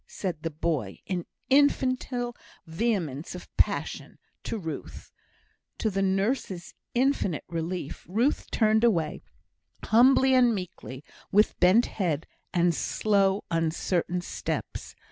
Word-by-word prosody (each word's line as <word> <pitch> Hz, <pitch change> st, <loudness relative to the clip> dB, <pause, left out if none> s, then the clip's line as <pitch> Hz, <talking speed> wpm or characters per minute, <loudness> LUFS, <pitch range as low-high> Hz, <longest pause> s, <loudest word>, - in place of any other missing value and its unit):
said 180 Hz, -6 st, -4 dB
the 165 Hz, -, -2 dB
boy, 150 Hz, -, -2 dB
in 180 Hz, -3 st, -3 dB, 0.2 s
infantile 255 Hz, -3 st, +2 dB, 0.3 s
vehemence 165 Hz, -, -2 dB
of 180 Hz, -, -11 dB
passion -, -, -1 dB, 0.2 s
to 230 Hz, -, -4 dB
Ruth. 165 Hz, -6 st, -7 dB, 0.7 s
To 220 Hz, -, 0 dB
the 195 Hz, 0 st, -1 dB
nurse's 195 Hz, -1 st, -1 dB, 0.2 s
infinite 245 Hz, -, +1 dB
relief, 170 Hz, -2 st, -4 dB
Ruth 235 Hz, +10 st, +1 dB
turned 220 Hz, 0 st, +3 dB
away, 170 Hz, -9 st, +1 dB, 0.6 s
humbly 260 Hz, +3 st, +5 dB
and 245 Hz, -3 st, +5 dB
meekly, 165 Hz, -7 st, -7 dB, 0.3 s
with 210 Hz, +2 st, +3 dB
bent 190 Hz, +7 st, +5 dB
head, 165 Hz, -7 st, -2 dB, 0.3 s
and 175 Hz, -1 st, +3 dB
slow, 200 Hz, +3 st, +1 dB
uncertain 165 Hz, +2 st, 0 dB
steps. -, -, -5 dB
190 Hz, 110 wpm, -27 LUFS, 165-230 Hz, 0.7 s, humbly